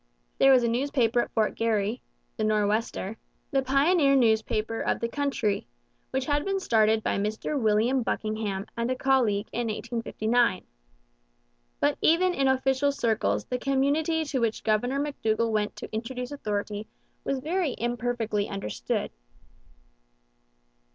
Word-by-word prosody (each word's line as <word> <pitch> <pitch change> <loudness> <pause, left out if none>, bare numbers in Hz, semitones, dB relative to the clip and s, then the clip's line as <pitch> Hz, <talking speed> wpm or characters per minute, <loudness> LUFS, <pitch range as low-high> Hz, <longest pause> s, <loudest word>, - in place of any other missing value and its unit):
There 270 - +7
was 255 -2 +6
a - - +2
newspaper 240 -1 +1
at - - -4
Fort 220 -2 +1
Garry 225 0 0 0.3
the 215 - -2
Nor'Wester 215 0 0 0.3
the 270 - +2
pioneer 275 +2 +3
newspaper 220 -2 +1
of - - 0
the 230 - -1
country 255 -6 -1 0.4
which 265 0 -1
had 290 0 +1
been 390 0 -1
started 220 - +2
by - - 0
Mr 215 +7 -2
William 225 +4 +2
Buckingham 215 -3 -2
and 235 +1 -1
a 255 - 0
colleague 245 -6 +2
in 240 -1 -2
1859. 230 -1 0 1.2
But - - +1
even 360 +3 +4
in 275 -4 +1
official 265 +1 +2
circles 230 -5 0
the 250 - -3
community 290 +5 +1
to 275 -3 -2
which 230 -2 -1
Governor 245 +5 +1
McDougall 230 -6 0
went 210 -1 -1
to - - -9
introduce 245 +3 -4
authority 210 -5 -3 0.4
was 275 - -1
very 320 +1 -1
imperfectly 235 -3 -1
understood. 105 - -3
235 Hz, 135 wpm, -27 LUFS, 215-270 Hz, 1.2 s, There